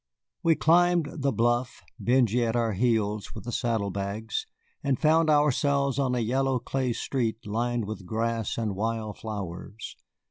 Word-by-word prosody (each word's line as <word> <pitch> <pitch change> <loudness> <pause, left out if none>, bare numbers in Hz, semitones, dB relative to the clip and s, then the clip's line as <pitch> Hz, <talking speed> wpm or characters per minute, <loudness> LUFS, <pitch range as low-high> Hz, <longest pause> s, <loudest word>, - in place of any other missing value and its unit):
We 165 -1 +4
climbed 175 -1 +4
the 140 0 +1
bluff, 120 +1 0 0.2
Benjy 120 -1 +3
at 115 0 0
our 115 -2 +1
heels 105 -1 0
with - - -7
the 120 - -5
saddle 110 -4 0
bags, 100 +3 -3 0.4
and 135 -2 +1
found 160 +1 +4
ourselves 140 -2 +2
on 130 -2 +1
a - - 0
yellow 130 +3 +1
clay 125 0 -1
street 115 -3 -2
lined 120 +2 -1
with 100 -3 -7
grass 115 +1 -1
and 110 -4 -1
wild 110 0 -3
flowers. 105 0 -6
120 Hz, 150 wpm, -27 LUFS, 110-135 Hz, 0.4 s, We